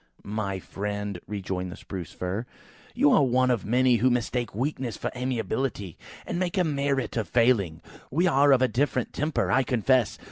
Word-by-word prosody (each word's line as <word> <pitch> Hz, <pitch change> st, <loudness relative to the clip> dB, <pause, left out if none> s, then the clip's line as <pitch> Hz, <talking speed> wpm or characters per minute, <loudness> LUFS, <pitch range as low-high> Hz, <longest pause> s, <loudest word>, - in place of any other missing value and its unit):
"My 100 Hz, -2 st, -3 dB
friend," 100 Hz, 0 st, -4 dB
rejoined 95 Hz, -3 st, -4 dB
the -, -, -7 dB
Spruce 90 Hz, -5 st, -7 dB
fir, 95 Hz, +7 st, -4 dB, 0.5 s
"you 145 Hz, -, +4 dB
are -, -, +5 dB
one 130 Hz, -1 st, +3 dB
of 120 Hz, -4 st, +1 dB
the -, -, -9 dB
many 125 Hz, 0 st, +4 dB
who 125 Hz, +4 st, +3 dB
mistake 120 Hz, -2 st, -1 dB
weakness 130 Hz, -2 st, -2 dB
for -, -, -3 dB
amiability, 120 Hz, -, -2 dB, 0.3 s
and 175 Hz, -, -3 dB
make 185 Hz, +2 st, -1 dB
a 185 Hz, -, +4 dB
merit 140 Hz, -4 st, -1 dB
of 110 Hz, -, -1 dB
a -, -, -26 dB
failing. 115 Hz, -10 st, +2 dB, 0.3 s
We 165 Hz, +7 st, +1 dB
are 145 Hz, -4 st, +4 dB
of 130 Hz, -1 st, +5 dB
a -, -, +4 dB
different 130 Hz, -1 st, -1 dB
temper, 150 Hz, +1 st, 0 dB
I 135 Hz, -, +4 dB
confess! 125 Hz, -2 st, +2 dB
125 Hz, 185 wpm, -26 LUFS, 105-135 Hz, 0.5 s, are